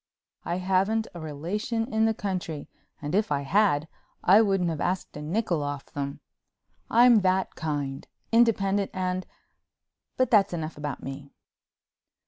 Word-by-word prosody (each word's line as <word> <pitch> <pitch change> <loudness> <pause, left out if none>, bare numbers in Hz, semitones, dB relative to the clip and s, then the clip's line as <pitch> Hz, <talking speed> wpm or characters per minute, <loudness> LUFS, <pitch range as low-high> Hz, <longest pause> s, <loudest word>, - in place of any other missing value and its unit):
I 170 - -2
haven't 195 +4 +1
a 175 - -8
relation 180 +10 -3
in 220 0 +3
the 225 - +2
country 180 -8 -4 0.4
and 145 +2 -3
if 205 -3 +1
I 140 -1 +1
had 160 -1 +2 0.4
I 200 +5 +7
wouldn't 195 -5 +1
have 155 - -4
asked 180 +1 -2
a 150 - -6
nickel 170 0 -1
off 145 -1 -5
them. 140 -1 -4 0.7
I'm 240 0 +6
that 185 0 +1
kind, 145 -4 -3 0.2
independent 205 -4 +3
and—but 185 +6 -5
that's 205 -5 +4
enough 160 -1 -4
about 145 -2 -5
me. 135 +1 -7
185 Hz, 135 wpm, -27 LUFS, 150-210 Hz, 0.7 s, I